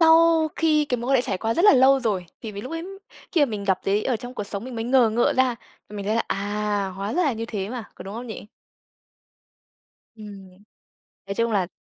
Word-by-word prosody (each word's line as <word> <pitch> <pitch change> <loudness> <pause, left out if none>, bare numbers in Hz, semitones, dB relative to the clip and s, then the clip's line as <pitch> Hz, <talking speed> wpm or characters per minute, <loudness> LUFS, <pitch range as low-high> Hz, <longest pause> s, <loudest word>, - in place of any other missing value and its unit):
sau 325 -1 +5
khi 310 -2 +3
cái 255 -4 -1
mối 240 +3 -3
quan 270 - +5
hệ 245 - +2
trải 195 -6 -2
qua 225 +2 -1
rất 345 - +2
là 415 - +9
lâu 265 +1 +5
rồi. 200 -7 -1
Thì 220 - -7
vì, 200 - -6
lúc 255 +8 -7
ấy 330 +1 -4 0.5
khi 330 - +3
mà - - -2
mình 210 -5 -5
gặp 190 -2 +2
thấy 200 +2 +1
ở 255 - +1
trong 245 +3 -9
cuộc 205 - -4
sống 200 +2 -6
mình 255 - -7
mới 225 0 -3
ngờ 245 -2 +4
ngợ 235 +2 +2
ra, 255 -2 +3 0.3
mình 205 -1 -6
thấy 215 - +1
là, 230 - +2
à, 205 -1 -2
hóa 200 +2 -3
ra 360 - +2
là 290 -6 +2
như 225 0 -4
thế 205 -3 -4
mà, 240 -2 -5
có - - -10
đúng 195 +2 -8
không 240 +2 -6
nhỉ? 220 - -8 1.7
Ừm. 200 -3 -11 0.8
Nói 195 - -4
chung 230 +1 0
là 195 -4 +1
230 Hz, 245 wpm, -24 LUFS, 205-260 Hz, 1.7 s, là